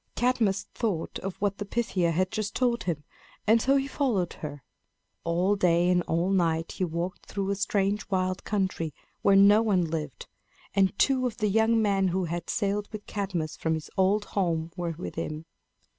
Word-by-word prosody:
Cadmus 230 Hz, -6 st, +1 dB
thought 205 Hz, -9 st, -2 dB
of 195 Hz, -1 st, -5 dB
what 200 Hz, -1 st, -1 dB
the -, -, -1 dB
Pythia 200 Hz, -5 st, 0 dB
had 185 Hz, +3 st, 0 dB
just 215 Hz, -1 st, -3 dB
told 240 Hz, -4 st, +1 dB
him, 160 Hz, -5 st, -2 dB, 0.4 s
and 225 Hz, +2 st, +5 dB
so 270 Hz, +3 st, +3 dB
he 270 Hz, -1 st, +2 dB
followed 240 Hz, -, 0 dB
her. 145 Hz, -3 st, -6 dB, 0.6 s
All 175 Hz, +4 st, +2 dB
day 175 Hz, -2 st, +3 dB
and 180 Hz, -1 st, +3 dB
all 170 Hz, +4 st, +1 dB
night 165 Hz, -3 st, +1 dB
he -, -, -3 dB
walked 170 Hz, +1 st, -3 dB
through 195 Hz, -1 st, -2 dB
a -, -, 0 dB
strange 200 Hz, +1 st, 0 dB
wild 185 Hz, -1 st, 0 dB
country 185 Hz, -7 st, -1 dB, 0.3 s
where 200 Hz, -, +5 dB
no 200 Hz, +2 st, +7 dB
one 195 Hz, -6 st, +2 dB
lived; 155 Hz, -4 st, -4 dB, 0.5 s
and 195 Hz, -1 st, +2 dB
two 260 Hz, -2 st, +3 dB
of 235 Hz, -, -6 dB
the 210 Hz, -, +1 dB
young 225 Hz, +2 st, +3 dB
men 200 Hz, -3 st, +2 dB
who 185 Hz, +1 st, 0 dB
had 170 Hz, 0 st, -4 dB
sailed 205 Hz, 0 st, 0 dB
with 215 Hz, -2 st, -7 dB
Cadmus 190 Hz, -6 st, -3 dB
from 160 Hz, 0 st, 0 dB
his 155 Hz, -, -7 dB
old 200 Hz, +2 st, +2 dB
home 170 Hz, -4 st, -1 dB
were 170 Hz, -3 st, -3 dB
with 175 Hz, -, -6 dB
him. 155 Hz, +1 st, -4 dB
190 Hz, 185 wpm, -27 LUFS, 170-210 Hz, 0.6 s, no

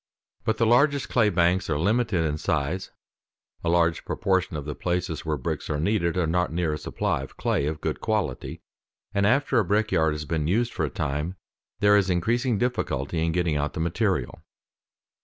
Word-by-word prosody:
But 110 Hz, -1 st, +1 dB
the 115 Hz, -, +3 dB
largest 140 Hz, +5 st, +3 dB
clay 110 Hz, -4 st, +3 dB
banks 90 Hz, 0 st, +2 dB
are 75 Hz, -, +1 dB
limited 100 Hz, 0 st, +1 dB
in 75 Hz, 0 st, -1 dB
size; 80 Hz, +6 st, -1 dB, 0.7 s
a 85 Hz, -, 0 dB
large 85 Hz, -1 st, +2 dB
proportion 95 Hz, -3 st, 0 dB
of 75 Hz, -, -6 dB
the 75 Hz, -, -3 dB
places 85 Hz, -1 st, -2 dB
where 75 Hz, -1 st, 0 dB
bricks 65 Hz, -, -4 dB
are 75 Hz, -, -1 dB
needed 85 Hz, -1 st, +1 dB
are 90 Hz, -, +2 dB
not 90 Hz, +1 st, 0 dB
near 85 Hz, -2 st, 0 dB
a 75 Hz, -, -4 dB
supply -, -, -1 dB
of -, -, -10 dB
clay 70 Hz, -, 0 dB
of 75 Hz, 0 st, -4 dB
good 80 Hz, -, -2 dB
quality; 105 Hz, -, -2 dB, 0.5 s
and 100 Hz, 0 st, +2 dB
after 135 Hz, +1 st, +3 dB
a -, -, +3 dB
brick 105 Hz, +4 st, +1 dB
yard 80 Hz, -1 st, +3 dB
has 75 Hz, 0 st, -5 dB
been 75 Hz, -1 st, -1 dB
used 115 Hz, +7 st, +1 dB
for 80 Hz, -, 0 dB
a -, -, -3 dB
time 75 Hz, +7 st, -3 dB, 0.5 s
there 105 Hz, 0 st, +6 dB
is 100 Hz, -2 st, +3 dB
increasing 115 Hz, +7 st, +1 dB
difficulty 85 Hz, -, -1 dB
in 80 Hz, -, +1 dB
getting 85 Hz, -2 st, 0 dB
out 75 Hz, +1 st, -1 dB
the -, -, -5 dB
material. 85 Hz, -, -1 dB
85 Hz, 195 wpm, -25 LUFS, 75-105 Hz, 0.7 s, there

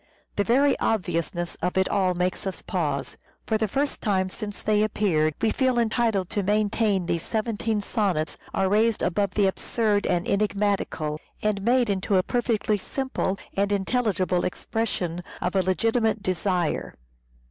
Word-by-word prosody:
The 205 Hz, -, +2 dB
very 270 Hz, +6 st, +4 dB
obviousness 175 Hz, -4 st, -1 dB
of 180 Hz, -, -1 dB
it 190 Hz, -, +3 dB
all 185 Hz, -3 st, +1 dB
makes 180 Hz, +3 st, -1 dB
us 190 Hz, -, -5 dB
pause. 145 Hz, -7 st, -2 dB, 0.3 s
For 220 Hz, -1 st, 0 dB
the 220 Hz, -, +1 dB
first 280 Hz, +7 st, -1 dB
time 190 Hz, -3 st, +1 dB
since 205 Hz, +1 st, -6 dB
they 210 Hz, -1 st, +3 dB
appeared 170 Hz, -8 st, +1 dB
we 225 Hz, -, +2 dB
feel 260 Hz, -2 st, +1 dB
entitled 225 Hz, -4 st, +1 dB
to 210 Hz, -, 0 dB
maintain 205 Hz, -1 st, +1 dB
these 170 Hz, -1 st, -1 dB
seventeen 220 Hz, 0 st, -1 dB
sonnets 195 Hz, -8 st, -1 dB, 0.2 s
are 190 Hz, -, +1 dB
raised 215 Hz, +3 st, +2 dB
above 195 Hz, +2 st, 0 dB
the 205 Hz, -, +4 dB
absurd 205 Hz, +2 st, 0 dB
and 175 Hz, 0 st, 0 dB
enigmatical, 200 Hz, -7 st, 0 dB, 0.2 s
and 210 Hz, -2 st, +1 dB
made 240 Hz, +3 st, +3 dB
into 200 Hz, 0 st, 0 dB
a 185 Hz, -, +3 dB
perfectly 220 Hz, -3 st, 0 dB
simple 260 Hz, -4 st, -2 dB, 0.2 s
and 200 Hz, +1 st, +1 dB
intelligible 195 Hz, -3 st, +1 dB
expression 180 Hz, -4 st, -2 dB, 0.2 s
of 180 Hz, +2 st, -2 dB
a 190 Hz, -, +4 dB
legitimate 220 Hz, +3 st, +1 dB
desire. 180 Hz, -2 st, -1 dB
200 Hz, 150 wpm, -25 LUFS, 185-220 Hz, 0.3 s, very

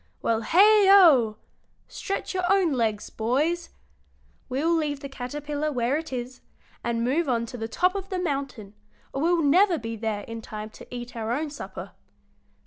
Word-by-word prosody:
Well, 225 Hz, -1 st, +1 dB
heigho! 370 Hz, -, +6 dB, 0.5 s
stretch 395 Hz, 0 st, -4 dB
your 370 Hz, 0 st, 0 dB
own 380 Hz, -6 st, +3 dB
legs, 220 Hz, -4 st, -1 dB
boys! 300 Hz, +10 st, -1 dB, 0.8 s
We'll 290 Hz, +6 st, +1 dB
leave 295 Hz, -3 st, -1 dB
the 280 Hz, -, -5 dB
caterpillar 290 Hz, +3 st, -4 dB
where 245 Hz, 0 st, 0 dB
it 320 Hz, 0 st, -4 dB
is, 250 Hz, 0 st, -5 dB, 0.4 s
and 230 Hz, -1 st, -1 dB
move 280 Hz, +5 st, 0 dB
on 235 Hz, -2 st, +1 dB
to 245 Hz, -, -9 dB
the 225 Hz, -1 st, -4 dB
top 365 Hz, +10 st, +1 dB
of 390 Hz, -1 st, -5 dB
the 375 Hz, -, -2 dB
mountain, 275 Hz, -, -4 dB, 0.4 s
or 270 Hz, -, -2 dB
we'll 340 Hz, +1 st, +2 dB
never 350 Hz, +5 st, +4 dB
be 230 Hz, -3 st, -5 dB
there 220 Hz, -2 st, -3 dB
in 230 Hz, +2 st, -8 dB
time 215 Hz, 0 st, -7 dB
to -, -, -13 dB
eat 245 Hz, 0 st, -7 dB
our 225 Hz, -1 st, -3 dB
own 295 Hz, +4 st, -2 dB
supper. 295 Hz, -, -8 dB
275 Hz, 165 wpm, -25 LUFS, 230-340 Hz, 0.8 s, heigho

